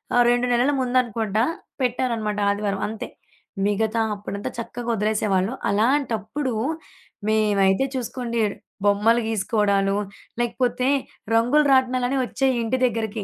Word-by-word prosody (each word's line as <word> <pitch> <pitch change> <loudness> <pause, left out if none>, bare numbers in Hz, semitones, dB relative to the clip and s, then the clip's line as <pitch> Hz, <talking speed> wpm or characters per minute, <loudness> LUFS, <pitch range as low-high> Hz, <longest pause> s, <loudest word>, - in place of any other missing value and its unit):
ఆహ్, 245 - +6
2 245 0 +2
నెలలు 250 +4 +3
ముందనుకోంట, 235 -4 0 0.4
పెట్టారనమాట 235 -4 -1
ఆదివారం 200 -1 -1
అంతే. 220 +3 -5 0.6
మిగతా 220 +2 +1
అప్పుడంతా 200 0 -5
చక్కగా 235 +1 -5
ఒదిలేసేవాళ్ళు. 210 0 0 0.2
అలాంటప్పుడు 235 +2 0 0.7
మేమైతే 210 0 +3
చూసుకోండి 240 -1 -3 0.5
బొమ్మలు 210 +4 +4
గీసుకోడాలు, 200 -2 +1 0.5
లేకపోతే 245 +1 0 0.5
రంగులు 250 +7 +4
రాట్నాలని 255 0 +2
ఒచ్చేయి 265 +1 0
ఇంటి 240 +3 0
దెగ్గరికి. 220 -3 -2
230 Hz, 100 wpm, -23 LUFS, 210-250 Hz, 0.7 s, ఆహ్